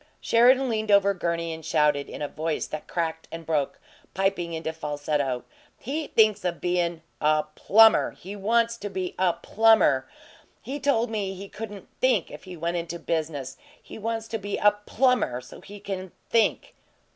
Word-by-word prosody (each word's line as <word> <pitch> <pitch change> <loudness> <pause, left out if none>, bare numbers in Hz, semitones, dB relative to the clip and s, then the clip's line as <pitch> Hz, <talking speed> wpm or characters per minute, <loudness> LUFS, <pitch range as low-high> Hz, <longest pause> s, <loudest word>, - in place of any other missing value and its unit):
Sheridan 255 +3 +4
leaned 220 -2 -2
over 200 -1 +5
Gurney 170 -2 -2
and 160 0 -9
shouted, 150 -2 +1
in - - -6
a - - -1
voice 155 +2 -2
that 155 - -7
cracked 160 -1 -3
and 165 0 -7
broke, 150 -3 -1 0.4
piping 190 -3 0
into 160 0 -3
falsetto: 145 -4 -2 0.4
"He 290 +5 -3
thinks 215 -3 +3
of 175 -2 -2
bein' 175 -2 -1 0.2
a 155 0 +3
PLUMBER! 220 +6 +5
He 195 +3 -8
wants 230 +3 +1
to 205 -2 -5
be 185 -2 -4
a 185 -2 +3
PLUMBER! 220 -14 +3 0.5
He 280 +3 -5
told 245 -5 +1
me 200 -3 -2
he 195 +2 -8
couldn't 205 -2 -8
THINK 255 0 +2
if - - -10
he 185 -2 -9
went 170 +2 -2
into 170 0 -4
business 150 -5 -3 0.2
he - - -11
wants 225 +1 -3
to 225 - -3
be 205 0 -3
a 210 - +5 0.2
plumber 250 - +2
so 125 - -13
he 205 0 -11
can 190 -2 -6 0.2
THINK!" 230 -2 +2
185 Hz, 170 wpm, -26 LUFS, 160-220 Hz, 0.5 s, over